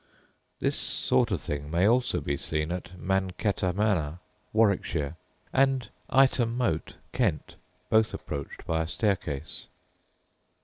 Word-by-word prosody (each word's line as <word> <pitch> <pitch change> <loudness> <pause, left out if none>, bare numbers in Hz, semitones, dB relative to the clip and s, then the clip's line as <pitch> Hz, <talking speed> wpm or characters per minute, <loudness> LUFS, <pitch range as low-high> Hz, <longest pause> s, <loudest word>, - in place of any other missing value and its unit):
This - - +1
sort 65 - +1
of - - 0
thing 75 0 -4
may 85 +5 +3
also 125 +2 +2
be 70 - -1
seen 75 +3 -2
at 90 0 -5
Mancetter 95 0 0
Manor, 90 -6 +1 0.3
Warwickshire, 90 -8 +1 0.4
and 135 -2 +2 0.2
Ightham 130 -3 +4
Moat, 100 -11 -1 0.2
Kent, 100 - 0 0.4
both 110 0 +4
approached 70 -2 -6
by 80 0 0
a 80 - -2
staircase. 85 -7 -2
95 Hz, 120 wpm, -28 LUFS, 80-110 Hz, 0.4 s, Ightham